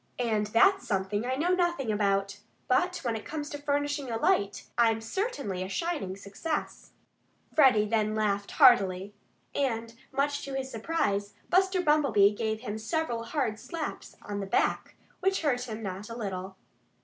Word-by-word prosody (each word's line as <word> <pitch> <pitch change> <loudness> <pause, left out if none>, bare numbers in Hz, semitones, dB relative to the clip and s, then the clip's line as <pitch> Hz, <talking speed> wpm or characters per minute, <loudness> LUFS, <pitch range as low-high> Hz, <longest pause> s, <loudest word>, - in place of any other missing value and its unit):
And 220 -4 0
that's 245 - +4
something 205 +2 -1
I 260 - 0
know 320 +6 0
nothing 345 -10 +1
about.... 200 -1 0 0.3
But 360 +8 +2
when 235 -3 -1
it 220 - -5
comes 295 -1 -5
to 290 - -5
furnishing 290 -1 -1
a 225 - -1
light, 200 -3 +1
I'm 225 -2 +3
certainly 225 - -3
a 185 - -4
shining 290 - -2
success." 205 +11 -5 0.6
Freddie 255 -8 +5
then 215 0 0
laughed 205 -2 0
heartily. 190 +1 +5 0.4
And 230 -4 -1 0.2
much 285 +1 0
to 275 -1 -5
his 265 0 -3
surprise, 205 -6 -1 0.2
Buster 375 +1 +3
Bumblebee 270 - +4
gave 220 +1 -2
him 220 -3 -4
several 235 -1 -2
hard 230 -6 -1
slaps 310 +5 -6
on 205 -1 -4
the 195 - -4
back, - - 0 0.2
which 385 -1 +1
hurt 250 -4 +1
him 220 0 -5
not 195 +2 -5
a 230 - -6
little. 190 -3 -5
230 Hz, 160 wpm, -29 LUFS, 205-290 Hz, 0.6 s, Freddie